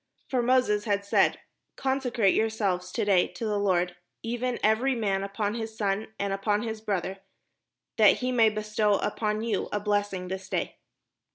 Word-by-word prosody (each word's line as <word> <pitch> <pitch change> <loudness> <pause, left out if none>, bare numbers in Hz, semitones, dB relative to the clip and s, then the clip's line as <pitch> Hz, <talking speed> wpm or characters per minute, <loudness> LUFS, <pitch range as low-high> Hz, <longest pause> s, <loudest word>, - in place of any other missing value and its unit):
For 255 -2 +1
Moses 240 -4 +2
had 200 -2 0
said, 200 - +2 0.2
" - - -54
Consecrate 250 -6 +2
yourselves 200 -5 0
to 225 - 0
day 195 -3 +4
to 230 - -6
the 210 -1 0
Lord, 180 -3 +1 0.3
even 240 +2 -2
every 235 +5 +3
man 195 -4 0
upon 205 +1 -2
his 225 -1 -5
son, 205 -1 -1
and 200 0 -1
upon 205 +2 0
his 220 -2 -4
brother; 195 -3 -2 0.8
that - - +6
he 255 0 -1
may 230 -3 +5
bestow 215 -1 +1
upon 210 +1 -1
you 225 -4 -1
a 210 - 0
blessing 205 -3 -1
this 190 +1 -6
day." - - -2
210 Hz, 170 wpm, -27 LUFS, 195-225 Hz, 0.8 s, that